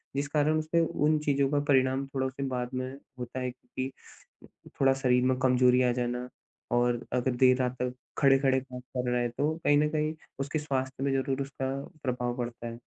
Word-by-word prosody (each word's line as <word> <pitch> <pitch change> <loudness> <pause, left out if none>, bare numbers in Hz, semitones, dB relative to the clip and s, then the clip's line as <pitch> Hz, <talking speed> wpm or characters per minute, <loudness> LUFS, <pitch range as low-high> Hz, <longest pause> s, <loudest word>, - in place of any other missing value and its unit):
जिस 140 +1 0
कारण 150 +1 +2
उसे 155 +2 +1
उन 155 -2 +2
चीज़ों 140 -1 +2
का 145 - +3
परिणाम 130 0 +3
थोड़ा 135 -1 -1
उसे 135 +1 -5
बाद 125 0 -2
में 130 0 -3 0.3
होता 125 +1 -5
है 125 -1 -2
कि 130 +1 -6 0.9
थोड़ा 135 0 +6
शरीर 125 -2 +2
में 130 0 +2
कमज़ोरी 125 0 +4
आ 125 - +3
जाना 125 0 -2 0.5
और 120 -1 +1
अगर 125 +1 +1
देर 130 0 +5
रात 125 -1 0
तक 125 0 -1 0.2
खड़े-खड़े 135 -1 +4
काम 130 -1 -9
कर 125 0 -4
रहा 125 0 +1
है 120 - 0
तो 145 +6 0
कहीं 145 - +5
न 150 +1 +3
कहीं 155 0 0 0.3
उसके 140 +3 -1
स्वास्थ्य 135 -2 -2
में 140 - +1
ज़रूर 135 0 0
उसका 135 -1 -3 0.3
प्रभाव 125 -1 -1
पड़ता 120 -1 -4
है। 115 0 -7
130 Hz, 195 wpm, -29 LUFS, 125-140 Hz, 0.9 s, थोड़ा